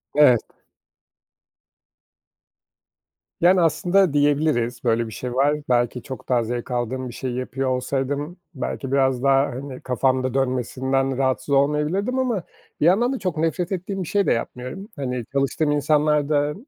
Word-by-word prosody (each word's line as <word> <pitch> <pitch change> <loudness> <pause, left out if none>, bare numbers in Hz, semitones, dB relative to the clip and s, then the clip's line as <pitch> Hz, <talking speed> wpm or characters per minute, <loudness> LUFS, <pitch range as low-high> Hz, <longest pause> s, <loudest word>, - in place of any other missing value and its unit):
Evet. 130 -6 +6 3.0
Yani, 180 +2 +5
aslında 175 +1 +3
diyebiliriz, 145 -5 +1
böyle 115 -1 +1
bir - - -9
şey 125 +4 -5
var. 140 +4 +3
Belki 120 0 +1
çok 130 - -9
daha 120 -2 +3
zevk 120 +2 -4
aldığım 125 +1 -2
bir - - -9
şeyi 125 0 -4
yapıyor 130 +1 -2
olsaydım, 140 +5 -2 0.2
belki 135 0 -4
biraz 135 -2 +2
daha, 135 0 +4
hani, 130 0 -7
kafamda 130 0 0
dönmesinden 130 0 0
rahatsız 130 +1 0
olmayabilirdim 150 - +1
ama 235 -9 0 0.4
bir - - +4
yandan 230 +9 +4
da 265 - -4
çok 180 -5 -3
nefret 165 +3 -1
ettiğim 190 +1 -3
bir - - -8
şey 200 +2 +1
de - - +2
yapmıyorum. 125 - -5
Hani, 125 -4 -3
çalıştığım 140 +2 +1
insanlar 150 0 +2
da, 145 -1 +1
135 Hz, 145 wpm, -23 LUFS, 125-155 Hz, 3.0 s, Evet